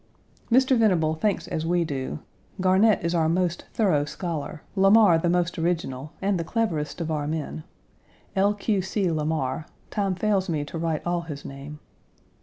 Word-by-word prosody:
Mr. 260 +2 +5
Venable 180 -9 +3
thinks 200 +6 -1
as 155 - -2
we 175 +1 +2
do 135 - -3 0.4
Garnett 190 +2 +4
is 170 - 0
our 160 -2 +2
most 175 0 0
thorough 180 -10 +2
scholar; 155 -1 -5
Lamar 195 -3 +6
the 170 - 0
most 175 -1 0
original, 155 -5 -2
and 195 -2 +1
the - - -1
cleverest 165 -7 -2
of 165 -1 -2
our 150 -2 -1
men 155 0 -4 0.7
L. 200 +2 +3
Q. 205 -1 0
C. 190 -1 -1
Lamar 155 -2 -1 0.2
time 195 -3 0
fails 195 -1 +1
me 150 -3 -1
to 165 +3 -6
write 165 -2 -2
all 175 0 0
his 150 -4 -8
name. 140 +2 -8
170 Hz, 165 wpm, -25 LUFS, 155-195 Hz, 0.7 s, Lamar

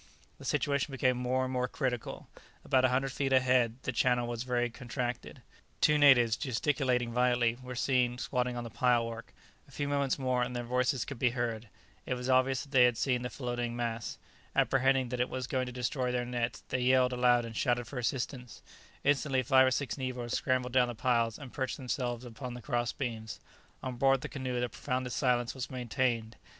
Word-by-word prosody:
The - - -10
situation 140 0 0
became 130 -1 +2
more 125 +1 0
and 130 0 -3
more 125 -1 0
critical. 125 -3 -3 0.4
About 130 -1 +3
a 130 - +5
hundred 135 +1 0
feet 135 +1 -1
ahead, 125 -3 +3
the - - -1
channel 125 0 +2
was 120 -1 -4
very 120 -1 0
contracted; 125 0 -5 0.4
two 150 -1 +4
natives, 120 -6 +6
gesticulating 125 -2 0
violently, 120 -1 +2
were 125 0 -7
seen 125 -1 +1
squatting 125 -1 -1
on 120 - -3
the 115 - -8
pilework; 115 -1 0 0.4
a - - -19
few 145 - -3
moments 140 -2 0
more 130 -2 0
and 125 0 -2
their 120 - -2
voices 125 +1 0
could 140 -5 -7
be 125 - +3
heard; 115 -2 -2 0.4
it 125 - 0
was 125 +1 -2
obvious 130 0 +3
that 140 - -15
they 130 -3 +6
had 120 -2 +2
seen 125 -1 +1
the 125 - -3
floating 120 -2 -3
mass; 115 -2 -3 0.4
apprehending 135 -1 +3
that 125 0 -3
it 125 - +1
was 130 -1 -3
going 130 0 -1
to - - -5
destroy 125 +1 -1
their 125 0 -1
nets, 120 +1 -3
they 130 - 0
yelled 125 0 +4
aloud 125 -1 +3
and 115 -1 -8
shouted 120 +1 +1
for 125 +2 -6
assistance; 125 -1 -3 0.4
instantly 135 -2 +2
five 130 +2 +5
or - - +5
six 135 0 -2
negroes 125 -2 -3
scrambled 125 -1 0
down 125 -1 +4
the 120 - -5
piles, 115 -2 +1
and 135 -4 -10
perched 130 -3 -2
themselves 125 -2 -3
upon 120 +1 -7
the 125 - -8
cross 120 0 0
beams. 115 -5 -5 0.4
On 130 -2 -4
board 135 0 +3
the - - -4
canoe 130 -3 -3
the 125 - 0
profoundest 125 0 -3
silence 120 -2 +1
was 130 -2 -5
maintained. 120 -3 -1
125 Hz, 200 wpm, -31 LUFS, 120-130 Hz, 0.4 s, natives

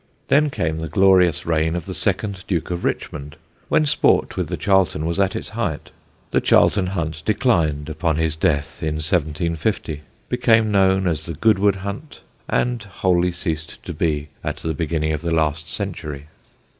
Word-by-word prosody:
Then 150 +1 +4
came 80 - -2
the 80 - -3
glorious 90 0 +4
reign 80 0 +1
of 85 - -4
the - - -5
second 100 -3 -1
Duke 90 -2 -1
of 85 0 -3
Richmond, 75 0 -3 0.3
when 155 - +3
sport 145 - +2
with - - -1
the - - -3
Charlton 95 -6 +2
was 85 +3 -1
at 95 -1 +2
its - - -4
height. - - -3 0.4
The - - +2
Charlton 95 -3 +4
Hunt 80 -4 -3
declined 85 - +1
upon 80 +1 -1
his 80 -1 0
death, 75 -2 -1
in 80 -1 -1
1750, 80 +1 -1 0.3
became 115 -1 +3
known 95 -1 +3
as 80 -2 -1
the 85 - -4
Goodwood 100 +2 +3
Hunt, 105 +10 -7 0.3
and 125 -2 0
wholly 90 -3 +1
ceased 80 -2 -4
to 90 - -6
be 75 -2 -1
at 75 0 -3
the 80 +1 -3
beginning 80 0 -1
of 75 - -3
the 85 - -2
last 80 0 0
century. 80 -9 -4
85 Hz, 170 wpm, -21 LUFS, 80-95 Hz, 0.4 s, Then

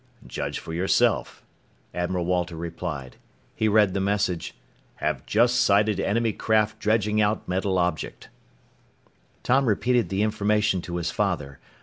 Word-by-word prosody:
"Judge - - -4
for 80 - -7
yourself," 90 +3 +1 0.5
Admiral 90 0 -2
Walter 90 -1 -1
replied. 80 -5 -6 0.4
He 110 - +1
read 105 -3 +4
the - - -1
message: 100 -3 -1 0.4
HAVE - - -3
JUST 120 +2 +3
SIGHTED 105 -1 +3
ENEMY 110 +3 +1
CRAFT 110 0 +1
DREDGING 105 0 +1
OUT 105 +1 0
METAL 95 +1 0
OBJECT 90 -3 -2 1.1
Tom 135 +1 +3
repeated 120 +2 +1
the 95 +2 0
information 105 -2 +1
to 85 0 -6
his 85 0 -2
father. 85 -10 -2
100 Hz, 130 wpm, -25 LUFS, 90-110 Hz, 1.1 s, read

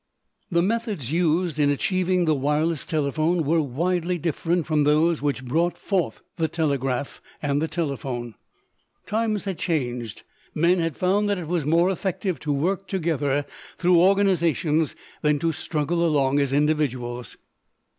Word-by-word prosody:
The 170 -1 +2
methods 210 - -2
used 170 -1 +1
in 145 -1 +4
achieving 185 +4 +1
the 155 - +3
wireless 150 +3 0
telephone 155 +3 0
were 160 +3 +2
widely 175 +6 -1
different 165 +1 -1
from 155 -2 +2
those 155 +2 +3
which 140 -2 -1
brought 165 +7 0
forth 180 - -2
the 160 - +1
telegraph 140 -5 -2 0.2
and 145 -1 0
the 160 - 0
telephone. 135 -8 -3 0.7
Times 215 -1 -1
had 190 -3 -4
changed. 125 - -2 0.3
Men 175 +3 +3
had 165 -3 -2
found 200 +3 +2
that 200 - +1
it 175 -3 -5
was 165 -4 -1
more 170 +4 +4
effective 185 -3 -2
to 150 - -3
work 185 +7 -1
together 145 -6 0 0.3
through 175 -1 +4
organizations 170 -5 +2 0.3
than 150 -1 +2
to 165 +3 0
struggle 160 +2 -1
along 145 -4 +2
as 140 -2 +1
individuals. 130 -6 -1
160 Hz, 145 wpm, -24 LUFS, 145-175 Hz, 0.7 s, in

